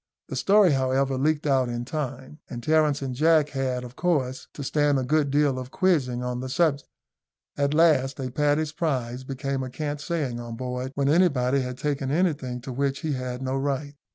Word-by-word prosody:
The -, -, -4 dB
story, 200 Hz, -3 st, +5 dB
however, 135 Hz, 0 st, +1 dB
leaked 150 Hz, +3 st, 0 dB
out 135 Hz, -3 st, +2 dB
in 120 Hz, 0 st, -3 dB
time, 135 Hz, 0 st, -5 dB
and 120 Hz, -1 st, -6 dB
Terence 150 Hz, -1 st, +2 dB
and 130 Hz, -2 st, -3 dB
Jack 155 Hz, +2 st, +3 dB
had, 130 Hz, -3 st, -2 dB
of 125 Hz, 0 st, -10 dB
course, 135 Hz, -7 st, -1 dB
to 145 Hz, -, -5 dB
stand 145 Hz, 0 st, +2 dB
a 130 Hz, -, 0 dB
good 150 Hz, +2 st, +1 dB
deal 140 Hz, -2 st, +2 dB
of 130 Hz, 0 st, -7 dB
quizzing 135 Hz, -9 st, +1 dB
on 125 Hz, 0 st, -3 dB
the 130 Hz, +1 st, -5 dB
subject. 140 Hz, 0 st, +1 dB, 0.7 s
At 140 Hz, +1 st, 0 dB
last, 150 Hz, -5 st, +3 dB
a 130 Hz, -2 st, -3 dB
Paddy's 150 Hz, +3 st, +1 dB
Prize 130 Hz, -6 st, -2 dB
became 135 Hz, 0 st, -3 dB
a 130 Hz, -, -4 dB
cant 145 Hz, +2 st, -4 dB
saying 145 Hz, -7 st, -2 dB
on 120 Hz, -1 st, -6 dB
board, 125 Hz, +1 st, -4 dB
when 140 Hz, -1 st, +1 dB
anybody 140 Hz, -5 st, +3 dB
had 125 Hz, -1 st, -5 dB
taken 140 Hz, -2 st, -2 dB
anything 145 Hz, -6 st, 0 dB
to 130 Hz, +1 st, -7 dB
which 140 Hz, +1 st, -1 dB
he 155 Hz, -3 st, -1 dB
had 130 Hz, -1 st, -4 dB
no 130 Hz, 0 st, -1 dB
right. 140 Hz, +1 st, -2 dB
135 Hz, 195 wpm, -25 LUFS, 130-150 Hz, 0.7 s, story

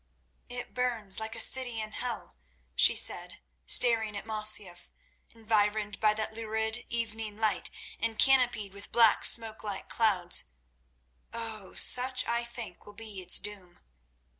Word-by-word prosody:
"It 245 Hz, 0 st, -5 dB
burns 230 Hz, -6 st, -3 dB
like 220 Hz, +1 st, -7 dB
a -, -, -6 dB
city 245 Hz, -1 st, +1 dB
in 215 Hz, 0 st, -5 dB
hell," 235 Hz, -, -6 dB, 0.4 s
she -, -, +6 dB
said, -, -, +2 dB, 0.3 s
staring 225 Hz, -4 st, +3 dB
at -, -, -8 dB
Masyaf, 210 Hz, -5 st, -2 dB, 0.4 s
environed 215 Hz, -2 st, -2 dB
by 215 Hz, -1 st, +2 dB
that 220 Hz, 0 st, -4 dB
lurid 220 Hz, +1 st, -2 dB
evening 225 Hz, -2 st, -4 dB
light 215 Hz, -2 st, +1 dB, 0.3 s
and 225 Hz, 0 st, -3 dB
canopied 245 Hz, -7 st, +2 dB
with 200 Hz, 0 st, -9 dB
black, 230 Hz, -2 st, +4 dB
smoke 225 Hz, -2 st, +1 dB
like 205 Hz, -2 st, -7 dB
clouds. 190 Hz, -6 st, +3 dB, 0.9 s
"Oh! 225 Hz, -4 st, -6 dB
such 255 Hz, +1 st, +5 dB
I 235 Hz, 0 st, -1 dB
think 235 Hz, -6 st, -9 dB
will 205 Hz, -, -12 dB
be 210 Hz, -2 st, -8 dB
its 180 Hz, -, +2 dB
doom." 190 Hz, -3 st, -8 dB
220 Hz, 140 wpm, -29 LUFS, 210-230 Hz, 0.9 s, she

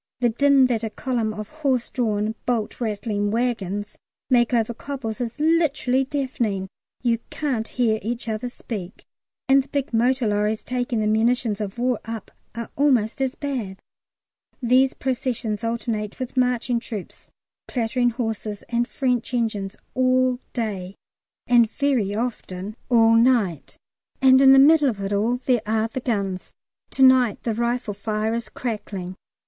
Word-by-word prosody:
The 240 Hz, -1 st, +3 dB
din 275 Hz, +3 st, +4 dB
that 235 Hz, -3 st, 0 dB
a 225 Hz, -, -1 dB
column 230 Hz, -1 st, -2 dB
of 215 Hz, -1 st, -6 dB
horse 275 Hz, -6 st, -1 dB
drawn, 215 Hz, -3 st, 0 dB
bolt 235 Hz, -1 st, -1 dB
rattling 210 Hz, -2 st, -1 dB
waggons 210 Hz, -3 st, -2 dB, 0.3 s
make 240 Hz, -2 st, +4 dB
over 235 Hz, -1 st, +1 dB
cobbles 250 Hz, -2 st, -5 dB
is 240 Hz, +3 st, -4 dB
literally 300 Hz, -5 st, +2 dB
deafening; 240 Hz, -9 st, -2 dB, 0.3 s
you 235 Hz, -2 st, +2 dB
can't 255 Hz, -7 st, -2 dB
hear 225 Hz, -3 st, +1 dB
each 235 Hz, +4 st, -4 dB
other 220 Hz, +2 st, -2 dB
speak. 200 Hz, -7 st, -7 dB, 0.4 s
And 275 Hz, +1 st, +6 dB
the 265 Hz, -, -13 dB
big 280 Hz, -3 st, -3 dB
motor 245 Hz, +2 st, +2 dB
lorries 210 Hz, +1 st, 0 dB
taking 245 Hz, -2 st, -1 dB
the -, -, 0 dB
"munitions 220 Hz, 0 st, +1 dB
of 205 Hz, +1 st, -5 dB
war" 245 Hz, -1 st, 0 dB
up 225 Hz, -2 st, -7 dB, 0.2 s
are 230 Hz, -1 st, -6 dB
almost 260 Hz, -5 st, +2 dB
as 265 Hz, -1 st, 0 dB
bad. 240 Hz, -10 st, -4 dB, 0.8 s
These 255 Hz, +1 st, +3 dB
processions 240 Hz, -4 st, -2 dB
alternate 225 Hz, -2 st, -2 dB
with 255 Hz, 0 st, -5 dB
marching 250 Hz, -1 st, +1 dB
troops, 215 Hz, -5 st, -8 dB, 0.4 s
clattering 245 Hz, 0 st, +1 dB
horses, 225 Hz, -3 st, -4 dB
and 240 Hz, 0 st, 0 dB
French 250 Hz, -3 st, -1 dB
engines 215 Hz, -4 st, -1 dB, 0.2 s
all 255 Hz, -1 st, +2 dB
day, 200 Hz, -5 st, -4 dB, 0.5 s
and 235 Hz, -2 st, +5 dB
very 250 Hz, -9 st, 0 dB
often 215 Hz, -4 st, -4 dB
all 230 Hz, -2 st, +5 dB
night, 230 Hz, -, +2 dB, 0.4 s
and 260 Hz, 0 st, +6 dB
in 270 Hz, -1 st, +8 dB
the 270 Hz, -, +8 dB
middle 290 Hz, +1 st, +6 dB
of 215 Hz, -5 st, -4 dB
it 195 Hz, +1 st, -2 dB
all 225 Hz, +5 st, +1 dB
there 245 Hz, -4 st, +3 dB
are 220 Hz, +1 st, +1 dB
the 260 Hz, -, -4 dB
guns. 200 Hz, -7 st, -3 dB, 0.3 s
Tonight 260 Hz, -4 st, +4 dB
the 230 Hz, -, 0 dB
rifle 235 Hz, -1 st, -1 dB
firing 215 Hz, +2 st, -2 dB
is 235 Hz, 0 st, -3 dB
crackling. 200 Hz, -6 st, -5 dB
235 Hz, 150 wpm, -23 LUFS, 215-255 Hz, 0.8 s, in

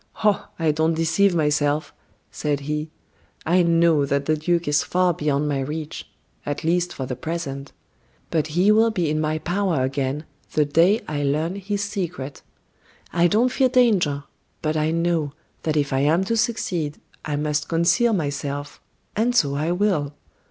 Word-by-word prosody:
"Oh! 210 Hz, -2 st, +2 dB
I 160 Hz, -2 st, +2 dB
don't 160 Hz, +2 st, +1 dB
deceive 165 Hz, +4 st, +2 dB
myself," 150 Hz, -1 st, +1 dB, 0.4 s
said 145 Hz, -2 st, -2 dB
he. 150 Hz, +2 st, -3 dB, 0.6 s
"I 180 Hz, +3 st, +4 dB
know 165 Hz, -3 st, +4 dB
that 140 Hz, 0 st, 0 dB
the 155 Hz, -, +2 dB
duke 170 Hz, +2 st, 0 dB
is 145 Hz, 0 st, +3 dB
far 180 Hz, -1 st, +1 dB
beyond 150 Hz, -1 st, 0 dB
my 140 Hz, -2 st, 0 dB
reach 150 Hz, +3 st, -5 dB, 0.3 s
at 145 Hz, 0 st, -4 dB
least 175 Hz, +2 st, +1 dB
for 130 Hz, -, -5 dB
the 125 Hz, -, -4 dB
present. 140 Hz, -1 st, -5 dB, 0.6 s
But 155 Hz, -2 st, +1 dB
he 180 Hz, +6 st, +3 dB
will 220 Hz, +2 st, +5 dB
be 180 Hz, -8 st, -1 dB
in 155 Hz, 0 st, 0 dB
my 155 Hz, 0 st, 0 dB
power 175 Hz, -4 st, 0 dB
again, 135 Hz, +3 st, -2 dB, 0.3 s
the 150 Hz, -, +3 dB
day 170 Hz, +9 st, +3 dB
I 150 Hz, -1 st, -2 dB
learn 150 Hz, +5 st, 0 dB
his 200 Hz, +1 st, -3 dB
secret. 175 Hz, -9 st, -4 dB, 0.7 s
I 175 Hz, 0 st, +4 dB
don't 225 Hz, +7 st, +3 dB
fear 260 Hz, -1 st, +3 dB
danger; 195 Hz, -, +3 dB, 0.4 s
but 155 Hz, 0 st, 0 dB
I 155 Hz, 0 st, +1 dB
know, 165 Hz, -3 st, 0 dB, 0.3 s
that 155 Hz, -1 st, -1 dB
if 145 Hz, -2 st, 0 dB
I 135 Hz, -, +2 dB
am 155 Hz, +6 st, +3 dB
to 230 Hz, +4 st, -1 dB
succeed, 180 Hz, -10 st, -1 dB, 0.3 s
I 150 Hz, -, -2 dB
must 150 Hz, +1 st, -1 dB
conceal 175 Hz, +8 st, +3 dB
myself, 145 Hz, -4 st, -3 dB, 0.3 s
and 240 Hz, +3 st, +1 dB
so 145 Hz, -, +3 dB
I 150 Hz, +4 st, -1 dB
will. 175 Hz, -7 st, 0 dB
160 Hz, 165 wpm, -23 LUFS, 145-180 Hz, 0.7 s, will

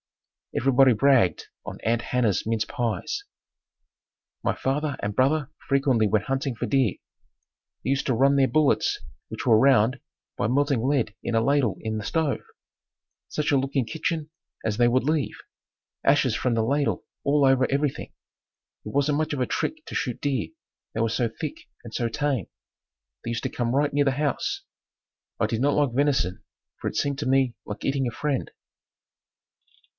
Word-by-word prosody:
Everybody 135 Hz, 0 st, +5 dB
bragged 115 Hz, -, +3 dB, 0.2 s
on -, -, -7 dB
"Aunt 115 Hz, +1 st, +1 dB
Hannah's 115 Hz, -6 st, +1 dB
mince 110 Hz, -1 st, 0 dB
pies." 120 Hz, -, -2 dB, 1.2 s
My -, -, +1 dB
father 145 Hz, +2 st, -1 dB
and 105 Hz, 0 st, -3 dB
brother 145 Hz, +2 st, +2 dB, 0.2 s
frequently 135 Hz, -5 st, +3 dB
went 105 Hz, -1 st, +1 dB
hunting 135 Hz, 0 st, -1 dB
for -, -, -3 dB
deer. 130 Hz, -8 st, +2 dB, 0.9 s
They 130 Hz, -, 0 dB
used 140 Hz, -, 0 dB
to 130 Hz, -, +2 dB
run 135 Hz, +4 st, +4 dB
their 135 Hz, -1 st, +4 dB
bullets, 155 Hz, -2 st, +2 dB, 0.3 s
which -, -, -6 dB
were 110 Hz, -3 st, +6 dB
round, 130 Hz, -1 st, +4 dB, 0.4 s
by 100 Hz, -, 0 dB
melting 140 Hz, 0 st, +2 dB
lead 130 Hz, -6 st, +1 dB
in 120 Hz, -, -1 dB
a -, -, +5 dB
ladle 135 Hz, -4 st, +2 dB
in 110 Hz, 0 st, -2 dB
the -, -, -5 dB
stove. 155 Hz, +3 st, 0 dB, 0.9 s
Such 150 Hz, -, -1 dB
a 140 Hz, -, +4 dB
looking 135 Hz, -1 st, 0 dB
kitchen 155 Hz, +5 st, -3 dB, 0.3 s
as 110 Hz, -2 st, 0 dB
they 120 Hz, +2 st, +4 dB
would 130 Hz, +2 st, +2 dB
leave! 150 Hz, 0 st, 0 dB, 0.7 s
Ashes -, -, +3 dB
from 125 Hz, -2 st, 0 dB
the 115 Hz, -, +2 dB
ladle 140 Hz, +5 st, 0 dB, 0.2 s
all 145 Hz, 0 st, +3 dB
over 135 Hz, -1 st, +4 dB
everything. 140 Hz, 0 st, -1 dB, 0.7 s
It -, -, -6 dB
wasn't 145 Hz, +1 st, +1 dB
much 155 Hz, -1 st, -1 dB
of 145 Hz, -, -2 dB
a 125 Hz, -, +2 dB
trick 315 Hz, -, -3 dB
to -, -, -8 dB
shoot 125 Hz, -3 st, -2 dB
deer, 140 Hz, -2 st, -1 dB, 0.5 s
they -, -, -3 dB
were 115 Hz, 0 st, +2 dB
so 115 Hz, +1 st, 0 dB
thick 325 Hz, -, -7 dB, 0.2 s
and 115 Hz, -, -9 dB
so 120 Hz, -1 st, -1 dB
tame. 130 Hz, -, -1 dB, 0.8 s
They -, -, -4 dB
used 115 Hz, -1 st, -3 dB
to -, -, -1 dB
come 120 Hz, +1 st, -1 dB
right 145 Hz, 0 st, +2 dB
near 145 Hz, 0 st, +3 dB
the 135 Hz, -, +3 dB
house. 150 Hz, -2 st, -1 dB, 0.8 s
I -, -, +3 dB
did 115 Hz, -, -2 dB
not 145 Hz, +1 st, +3 dB
like 145 Hz, -5 st, +2 dB
venison 135 Hz, -9 st, +1 dB, 0.4 s
for -, -, -1 dB
it -, -, -10 dB
seemed 140 Hz, -1 st, 0 dB
to 145 Hz, -, -2 dB
me 135 Hz, -2 st, +3 dB
like 105 Hz, 0 st, -6 dB
eating 135 Hz, -1 st, +1 dB
a -, -, -2 dB
friend. 140 Hz, 0 st, -2 dB
135 Hz, 175 wpm, -25 LUFS, 115-145 Hz, 1.2 s, were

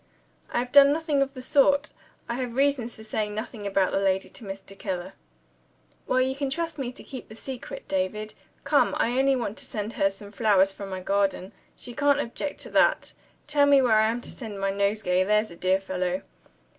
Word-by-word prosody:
"I -, -, -1 dB
have 245 Hz, +1 st, -1 dB
done 280 Hz, 0 st, +8 dB
nothing 305 Hz, -2 st, +1 dB
of 275 Hz, +1 st, -1 dB
the 255 Hz, -, -5 dB
sort. 285 Hz, 0 st, +3 dB, 0.4 s
I -, -, -2 dB
have 250 Hz, -2 st, -4 dB
reasons 270 Hz, -3 st, +1 dB
for 220 Hz, -, -12 dB
saying 215 Hz, -1 st, -3 dB
nothing 215 Hz, -1 st, -5 dB
about 195 Hz, -1 st, +1 dB
the -, -, +1 dB
lady 190 Hz, -1 st, +1 dB
to -, -, -12 dB
Mr. 195 Hz, 0 st, -8 dB
Keller." 190 Hz, -1 st, -4 dB, 0.9 s
"Well, 255 Hz, -, +2 dB
you 260 Hz, +1 st, +1 dB
can 275 Hz, 0 st, -2 dB
trust 330 Hz, +1 st, -3 dB
me 250 Hz, -2 st, -3 dB
to -, -, -10 dB
keep 260 Hz, -, -9 dB
the 220 Hz, -, -10 dB
secret, 255 Hz, +2 st, -7 dB
David. 210 Hz, +3 st, -2 dB, 0.3 s
Come! -, -, +3 dB
I 245 Hz, +3 st, +1 dB
only 270 Hz, 0 st, +4 dB
want 235 Hz, -4 st, -3 dB
to -, -, 0 dB
send 215 Hz, +1 st, -4 dB
her 195 Hz, -, +2 dB
some 200 Hz, +1 st, -10 dB
flowers 200 Hz, -3 st, +3 dB
from 200 Hz, 0 st, -8 dB
my 185 Hz, -1 st, -5 dB
garden. 195 Hz, 0 st, 0 dB, 0.2 s
She 245 Hz, -, -6 dB
can't 285 Hz, +2 st, +3 dB
object 265 Hz, +5 st, -4 dB
to -, -, -7 dB
that. -, -, +3 dB, 0.3 s
Tell 290 Hz, -1 st, +3 dB
me 280 Hz, -1 st, +6 dB
where 235 Hz, -5 st, +4 dB
I 220 Hz, 0 st, +4 dB
am 235 Hz, +2 st, -2 dB
to -, -, -5 dB
send 215 Hz, -6 st, -7 dB
my 195 Hz, 0 st, 0 dB
nosegay, 200 Hz, -2 st, +1 dB
there's 210 Hz, +1 st, +1 dB
a -, -, -10 dB
dear 185 Hz, +2 st, +2 dB
fellow." 185 Hz, -1 st, -2 dB
220 Hz, 210 wpm, -26 LUFS, 195-265 Hz, 0.9 s, done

